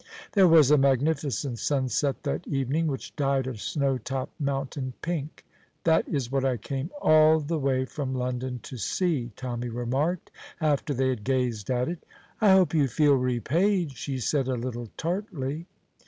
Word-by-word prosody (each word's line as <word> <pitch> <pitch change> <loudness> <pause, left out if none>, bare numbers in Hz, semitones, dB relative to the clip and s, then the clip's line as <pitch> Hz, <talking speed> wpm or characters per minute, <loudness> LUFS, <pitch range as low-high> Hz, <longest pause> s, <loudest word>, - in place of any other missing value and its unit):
There 195 -3 +6
was 155 -4 +6
a 150 - +6
magnificent 140 -2 +1
sunset 135 +1 0
that 145 +3 -3
evening, 140 +3 0
which 135 -3 -5
dyed 140 -3 +1
a 130 -2 -4
snow 135 +4 -1
topped 130 +6 -5
mountain 135 -1 -2
pink. 160 -3 -4 0.4
"That 160 -1 +3
is 130 -5 -2
what 135 -1 +1
I 130 -2 +1
came 135 +7 -4
all 155 - +6
the 155 +2 -2
way 130 -2 +1
from 130 -1 -4
London 125 0 -3
to 130 - -8
see," 135 - -1
Tommy 120 -1 -4
remarked, 130 +9 -2 0.3
after 150 -2 0
they 130 +1 +1
had 125 -5 -2
gazed 125 -5 -1
at 125 -1 +1
it. 175 0 -5 0.4
"I 210 - +5
hope 190 -3 +4
you 150 -4 +3
feel 145 +4 +3
repaid," 140 - +1
she 135 +1 -4
said, 135 +2 0
a 130 - 0
little 120 -1 -5
tartly. 165 -4 -3
135 Hz, 165 wpm, -27 LUFS, 125-155 Hz, 0.4 s, There